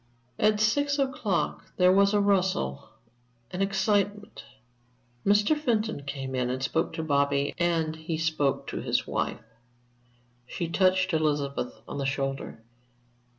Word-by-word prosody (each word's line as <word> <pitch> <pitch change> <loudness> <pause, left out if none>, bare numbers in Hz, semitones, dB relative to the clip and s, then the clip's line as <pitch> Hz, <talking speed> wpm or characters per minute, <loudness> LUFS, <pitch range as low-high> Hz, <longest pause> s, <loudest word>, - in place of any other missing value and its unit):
At 215 0 +3
six 285 +7 +2
o'clock 245 -9 -1
there 180 0 +5
was 200 +1 +4
a - - +4
rustle, 185 - 0 0.6
an 180 - -3
excitement. 200 +1 0 0.8
Mr. 205 +8 +4
Fenton 225 - -1
came 135 -2 -5
in 125 -1 0
and 130 +1 -3
spoke 160 +5 0
to 160 -1 -3
Bobby, 140 -1 +1
and 165 -2 +1
he 160 0 -4
spoke 155 -4 0
to - - -4
his - - 0
wife. - - -2 1.0
She 170 - -3
touched 185 +1 +2
Elizabeth 145 -6 -1
on - - -5
the 140 - -2
shoulder. 135 -4 -3
170 Hz, 130 wpm, -27 LUFS, 140-205 Hz, 1.0 s, there